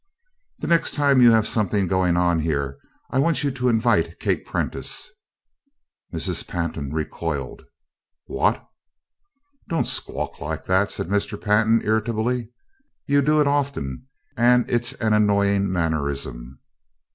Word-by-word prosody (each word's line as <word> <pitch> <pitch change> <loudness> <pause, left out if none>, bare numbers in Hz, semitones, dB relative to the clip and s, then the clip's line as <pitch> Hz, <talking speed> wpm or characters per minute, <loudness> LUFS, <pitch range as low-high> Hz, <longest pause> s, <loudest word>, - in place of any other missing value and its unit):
"The - - -6
next 170 -1 +2
time 140 -3 +3
you 120 - +8
have 110 -2 +4
something 105 -2 0
going 90 -1 +1
on 85 -1 +2
here 70 -4 -2 0.3
I 130 - +1
want 165 +3 +2
you 140 - +1
to 125 -1 0
invite 110 -8 +1
Kate - - -1
Prentice." - - -2 1.0
Mrs. - - -1
Pantin 80 -5 -4
recoiled. 75 -3 -4 0.6
"What!" - - 0 1.0
"Don't 165 - 0
squawk - - -2
like - - -5
that!" 95 +2 +2
said - - -4
Mr. 105 +1 -1
Pantin, 110 +2 +2
irritably. 110 +2 0 0.6
"You 140 0 +3
do 150 +2 +2
it 150 - +3
often, 140 - -2 0.3
and 120 +1 +4
it's 120 0 +1
an 110 -2 0
annoying 100 -2 +2
mannerism." 70 -7 -3
105 Hz, 130 wpm, -23 LUFS, 85-125 Hz, 1.0 s, you